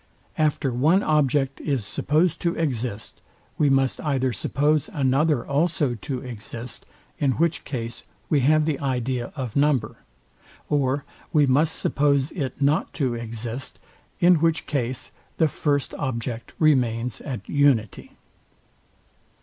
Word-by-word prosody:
After 150 -4 +1
one 160 - +3
object 140 -2 +1
is 135 -8 -1
supposed 160 - +1
to 170 -1 0
exist, 125 -8 -3 0.4
we 145 - +4
must 135 -1 +2
either 130 -4 0
suppose 150 - +1
another 140 - +1
also 150 -1 +1
to 125 +3 -4
exist; 120 0 -8 0.3
in 135 -3 +2
which 165 +4 0
case 115 -3 -5 0.2
we 150 - +3
have 155 +3 +3
the 150 -3 -1
idea 125 -2 -2
of 130 -6 -5
number: 140 -6 +1 0.7
Or 140 -1 +1 0.3
we 150 -2 +4
must 150 +5 +2
suppose 140 0 +1
it 135 -8 -4
not 145 +2 +2
to 130 -5 0
exist; 115 +2 -5 0.4
in 175 0 +6
which 165 +1 +1
case 130 -3 -3 0.3
the 160 - +4
first 145 -1 -1
object 120 -3 -4
remains 125 -6 +2
at 125 -9 -6
unity. 140 -8 +1
135 Hz, 125 wpm, -24 LUFS, 125-150 Hz, 0.7 s, in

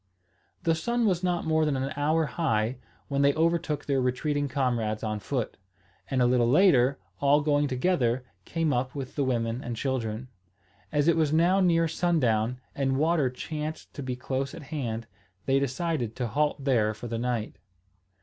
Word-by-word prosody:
The 165 -1 +3
sun 235 +9 0
was 185 -4 +1
not 180 -1 0
more 160 0 +2
than 150 -3 +1
an 135 +2 -2
hour 155 +3 +2
high, 125 -7 0 0.3
when 140 -1 0
they 140 0 +4
overtook 165 -2 0
their 135 -2 +1
retreating 145 +3 0
comrades 120 -6 -1
on 110 -1 -2
foot, 120 +2 -3 0.5
and 130 -2 +2
a - - +4
little 120 -1 +3
later, 140 -5 +5 0.2
all 145 +1 +4
going 145 -1 +2
together, 130 -3 +1 0.2
came 160 - 0
up 125 +2 -1
with 135 -2 -5
the 145 - +1
women 120 -1 -1
and 120 - -4
children. 120 -2 -2 0.6
As 145 0 +2
it 170 - +5
was 155 -3 +2
now 170 +5 +4
near 165 -3 +3
sundown, 125 -9 +1
and 135 -1 0
water 155 -2 +2
chanced 155 +4 -6
to 145 - -6
be 130 -2 -3
close 135 +3 -3
at 165 - -9
hand, 115 -6 -3 0.4
they 135 0 +3
decided 140 -3 -2
to 125 - -2
halt 145 +3 0
there 110 -6 +2
for 110 - -9
the 115 -1 -3
night. 120 -2 -2
140 Hz, 175 wpm, -27 LUFS, 125-155 Hz, 0.6 s, later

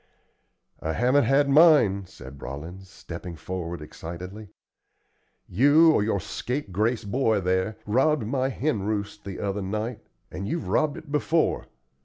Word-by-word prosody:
"I 80 - -2
haven't 125 - +3
had 140 +1 +3
mine," 140 - +5
said 70 -6 -12
Rollins, 85 +8 -8
stepping 85 -2 -8
forward 85 -1 -5
excitedly. 90 +7 -8 1.0
"You, 145 - +5
or 155 - +3
your 105 -1 0
scapegrace 115 -1 -2
boy 110 0 +1
there, 95 +3 0
robbed 130 +4 +2
my 130 +3 0
hen 135 -4 -1
roost 105 0 -3
the 100 -2 -6
other 100 0 -2
night, 105 +4 -3 0.3
and 100 +2 -5
you've 165 +2 -3
robbed 155 -2 +1
it 155 - -11
before. 155 +2 +1
105 Hz, 135 wpm, -26 LUFS, 95-135 Hz, 1.0 s, mine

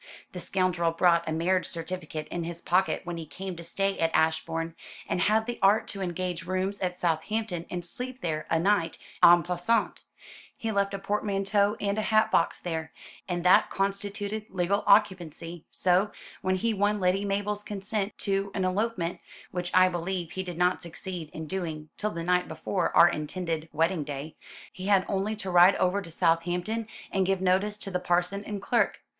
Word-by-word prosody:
The 180 - -6
scoundrel 180 -2 +1
brought 170 -1 +3
a - - -1
marriage 180 +4 +1
certificate 165 -2 -5
in 175 - -3
his 170 0 -5
pocket 185 +2 +1
when 175 -1 -5
he 165 - -6
came 185 +5 -6
to 170 - -7
stay 195 +3 -1
at 165 - +3
Ashbourne, 165 +1 0 0.3
and 180 - -1
had 220 +2 +3
the 240 0 -4
art 210 +4 +4
to 200 - -5
engage 180 -1 -3
rooms 185 +2 -1
at 180 -1 -2
Southampton 175 +2 -1
and 175 -1 -4
sleep 255 +7 -5
there 155 -2 -2
a 165 - +2
night 180 -2 +1 0.2
en 175 0 +8
passant. 180 +6 0 0.6
He 225 - -2
left 200 -1 0
a - - -2
portmanteau 200 +1 0
and 200 +1 0
a 215 - -1
hat 215 0 +4
box 165 - +2
there, 160 -2 -4 0.4
and 175 -2 -2
that 180 - +5
constituted 205 +2 -2
legal 190 +2 0
occupancy; 175 -5 +2
so, 185 +3 +2 0.3
when 185 -1 +1
he 225 +4 0
won 205 +1 +1
Lady 185 +1 +2
Mabel's 205 +1 -1
consent 205 0 -3
to 195 0 0
an 190 -2 0
elopement 185 -2 -1 0.3
which 180 -1 -2
I 185 0 +6
believe 175 -1 -3
he 190 - -3
did 180 -3 -6
not 180 +1 +2
succeed 170 -1 -6
in 160 +1 -7
doing 155 -3 -4
till 215 - -1
the 170 -5 -5
night 180 +1 +2
before 190 - -1
our 170 - +9
intended 160 0 -3
wedding 165 +1 +1
day 145 +2 -6 0.4
he 185 0 -6
had 195 -2 +4
only 200 +2 -1
to 195 -3 -5
ride 180 +2 +7
over 185 +2 +1
to 175 - -10
Southampton 175 +6 0 0.2
and 195 - +2
give 190 0 +1
notice 190 +3 +1
to 200 -2 -7
the 180 - 0
parson 180 +3 0
and 205 -1 -4
clerk. - - +1
185 Hz, 185 wpm, -28 LUFS, 170-200 Hz, 0.6 s, our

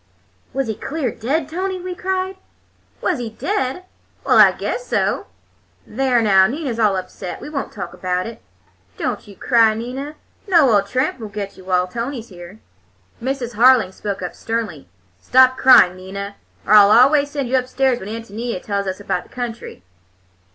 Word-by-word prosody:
"Was 270 0 -1
he 220 - -2
clear 270 +2 -3
dead, 275 +7 -2
Tony?" 370 +4 -3
we 365 0 -5
cried. 375 +1 -3 0.6
"Was - - 0
he 235 -2 -4
dead? 315 - -3 0.4
Well, - - +4
I - - +8
guess - - -4
so! - - 0 0.6
There, 250 0 +1
now, 190 -3 +5
Nina's 260 -2 -4
all 210 -3 +3
upset. 185 0 -6
We 300 - -9
won't 275 -3 -4
talk 200 - -7
about 180 0 -2
it. 230 - -9 0.6
Don't - - -3
you 200 - -13
cry, 225 -1 +3
Nina. 260 +6 -6 0.3
No 330 -9 +5
old 200 -1 +3
tramp 255 +3 -1
won't 215 -3 -8
get 200 -1 -5
you 185 - -15
while 180 -1 +1
Tony's 235 +4 -5
here." 175 +1 -12 0.6
Mrs. 255 -1 -3
Harling 235 -3 +5
spoke 200 -1 -5
up 180 - -4
sternly. 225 -10 -4 0.3
"Stop 260 - +5
crying, 255 -9 +6
Nina, 200 +2 -7 0.3
or 210 - +2
I'll 205 -1 +8
always 280 +6 +5
send 285 -3 -3
you 255 - 0
upstairs 255 0 +1
when 190 - -8
Ántonia 225 -1 -5
tells 200 0 -3
us 190 +1 -3
about 205 - -2
the - - -20
country. 235 - -7
235 Hz, 170 wpm, -20 LUFS, 200-270 Hz, 0.6 s, I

